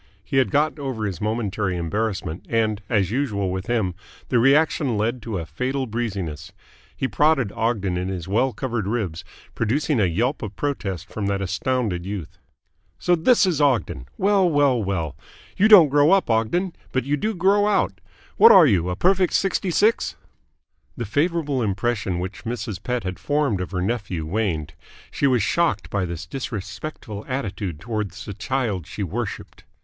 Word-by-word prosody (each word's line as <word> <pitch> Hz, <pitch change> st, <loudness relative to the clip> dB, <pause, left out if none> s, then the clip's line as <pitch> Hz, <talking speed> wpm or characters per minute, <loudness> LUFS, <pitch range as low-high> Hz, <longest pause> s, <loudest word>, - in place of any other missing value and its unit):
He 135 Hz, -, -2 dB
had 130 Hz, -, +3 dB
got 155 Hz, +1 st, +1 dB
over 130 Hz, -6 st, -3 dB
his 100 Hz, -1 st, -4 dB
momentary 105 Hz, -4 st, -1 dB
embarrassment, 95 Hz, -1 st, -3 dB
and, 110 Hz, -2 st, +1 dB
as 100 Hz, -5 st, +1 dB
usual 105 Hz, -8 st, -1 dB
with 95 Hz, 0 st, -4 dB
him, 110 Hz, -6 st, 0 dB, 0.4 s
the 125 Hz, -, +3 dB
reaction 135 Hz, -1 st, +3 dB
led 115 Hz, +4 st, -1 dB
to 110 Hz, -3 st, -4 dB
a 85 Hz, -, -4 dB
fatal 130 Hz, -, -2 dB
breeziness. 95 Hz, -9 st, -4 dB, 0.5 s
He 130 Hz, -, 0 dB
prodded 145 Hz, -7 st, +2 dB
Ogden 100 Hz, -6 st, -1 dB
in 90 Hz, +1 st, -2 dB
his 90 Hz, -3 st, -4 dB
well 120 Hz, +7 st, +2 dB
covered 120 Hz, -6 st, -3 dB
ribs, 100 Hz, -6 st, -2 dB, 0.3 s
producing 130 Hz, +4 st, 0 dB
a 100 Hz, -, +4 dB
yelp 110 Hz, -, 0 dB
of 105 Hz, -2 st, -6 dB
protest 100 Hz, -, -3 dB
from 105 Hz, -2 st, -4 dB
that 100 Hz, -1 st, 0 dB
astounded 100 Hz, 0 st, -1 dB
youth. 95 Hz, -4 st, -6 dB, 0.6 s
"So 175 Hz, -, +2 dB
this 205 Hz, +7 st, +4 dB
is 170 Hz, -5 st, 0 dB
Ogden! 115 Hz, -, +1 dB
Well, 195 Hz, -2 st, +3 dB
well, 140 Hz, -6 st, +3 dB
well! 85 Hz, -7 st, -2 dB, 0.4 s
You 210 Hz, -, +4 dB
don't 190 Hz, -9 st, +9 dB
grow 145 Hz, +2 st, +4 dB
up, 190 Hz, -10 st, +2 dB
Ogden, 165 Hz, -, +1 dB, 0.2 s
but 130 Hz, -, 0 dB
you 140 Hz, +3 st, 0 dB
do 215 Hz, +9 st, -2 dB
grow 200 Hz, +3 st, +3 dB
out. 205 Hz, -2 st, 0 dB, 0.4 s
What 455 Hz, -, +9 dB
are 170 Hz, -, +9 dB
you 90 Hz, -, +2 dB
a 90 Hz, -, -1 dB
perfect 185 Hz, -, +2 dB
sixty 195 Hz, -1 st, +1 dB
six?" 210 Hz, +6 st, +2 dB, 0.8 s
The 120 Hz, -, -3 dB
favourable 145 Hz, -, 0 dB
impression 100 Hz, -2 st, -1 dB
which 90 Hz, +3 st, -5 dB
Mrs. 115 Hz, -4 st, -4 dB
Pett 125 Hz, -1 st, -2 dB
had 95 Hz, -1 st, -5 dB
formed 145 Hz, -10 st, 0 dB
of 90 Hz, -, -4 dB
her 90 Hz, -2 st, -2 dB
nephew 100 Hz, -7 st, -2 dB
waned. 80 Hz, -5 st, -2 dB, 0.4 s
She 140 Hz, -, +1 dB
was 125 Hz, -6 st, +2 dB
shocked 105 Hz, -, 0 dB
by 100 Hz, -2 st, 0 dB
this 85 Hz, -1 st, -5 dB
disrespectful 110 Hz, -, -6 dB
attitude 100 Hz, -, -3 dB
towards 105 Hz, 0 st, -4 dB
the 105 Hz, -, -6 dB
child 115 Hz, -, -2 dB
she -, -, -5 dB
worshipped. -, -, -5 dB
115 Hz, 170 wpm, -23 LUFS, 95-140 Hz, 0.8 s, don't